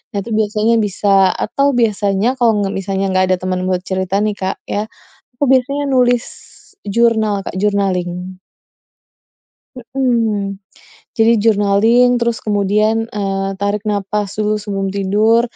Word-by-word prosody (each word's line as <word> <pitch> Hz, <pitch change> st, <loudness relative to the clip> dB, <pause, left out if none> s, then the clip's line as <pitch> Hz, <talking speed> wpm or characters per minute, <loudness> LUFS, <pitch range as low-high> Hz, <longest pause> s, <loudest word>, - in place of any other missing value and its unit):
nanti 200 Hz, +3 st, -3 dB
biasanya 215 Hz, +1 st, +1 dB
bisa 205 Hz, 0 st, -3 dB, 0.3 s
atau 275 Hz, +6 st, 0 dB
biasanya 205 Hz, -2 st, +1 dB
kalau 235 Hz, -2 st, +4 dB
nggak 195 Hz, 0 st, -2 dB
misalnya 195 Hz, 0 st, -2 dB
nggak 185 Hz, 0 st, +3 dB
ada 185 Hz, -, +2 dB
teman 185 Hz, 0 st, -2 dB
buat 180 Hz, -1 st, -1 dB
cerita 190 Hz, 0 st, -1 dB
nih, 215 Hz, -, 0 dB
Kak, 190 Hz, 0 st, -2 dB
ya. 205 Hz, -, -1 dB, 0.6 s
Aku -, -, -1 dB
biasanya 270 Hz, +2 st, +1 dB
nulis 245 Hz, -1 st, +3 dB, 0.6 s
jurnal, 220 Hz, -1 st, +1 dB
Kak, -, -, -5 dB
journaling. 185 Hz, -3 st, -1 dB, 1.4 s
Heeh. 230 Hz, -6 st, -1 dB, 0.6 s
Jadi 225 Hz, +1 st, +5 dB
journaling, 220 Hz, +3 st, +4 dB
terus 235 Hz, -1 st, 0 dB
kemudian, 215 Hz, +2 st, +1 dB
eee, 195 Hz, -1 st, -2 dB
tarik 200 Hz, 0 st, -1 dB
napas 205 Hz, 0 st, -2 dB
dulu 215 Hz, 0 st, +1 dB
sebelum 195 Hz, -2 st, -3 dB
tidur. 210 Hz, +4 st, +2 dB
205 Hz, 125 wpm, -16 LUFS, 195-225 Hz, 1.4 s, Jadi